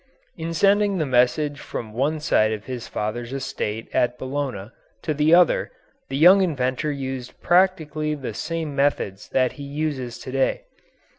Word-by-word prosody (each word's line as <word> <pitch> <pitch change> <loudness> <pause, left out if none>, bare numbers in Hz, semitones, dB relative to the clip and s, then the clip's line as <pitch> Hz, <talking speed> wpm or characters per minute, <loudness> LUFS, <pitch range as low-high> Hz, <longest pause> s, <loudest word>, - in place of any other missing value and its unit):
In 165 0 -4
sending 200 +2 +3
the 155 - 0
message 135 +3 +2
from 110 -2 -6
one 145 +6 0
side 110 -8 +2
of 105 -1 -4
his 125 -3 -6
father's 115 +3 -4
estate 115 -5 -4
at 125 0 +1
Bologna 130 -6 -4 0.3
to 155 - 0
the 150 +3 +4
other 175 -2 +4 0.4
the 135 - -2
young 180 +6 +7
inventor 140 -4 0
used 135 -3 -5
practically 160 -4 +2
the 135 -6 -6
same 160 - -4
methods 135 -8 0
that 130 -1 +2
he 145 - -10
uses 140 -4 -3
to - - -8
day. 135 0 +1
140 Hz, 155 wpm, -23 LUFS, 125-155 Hz, 0.4 s, young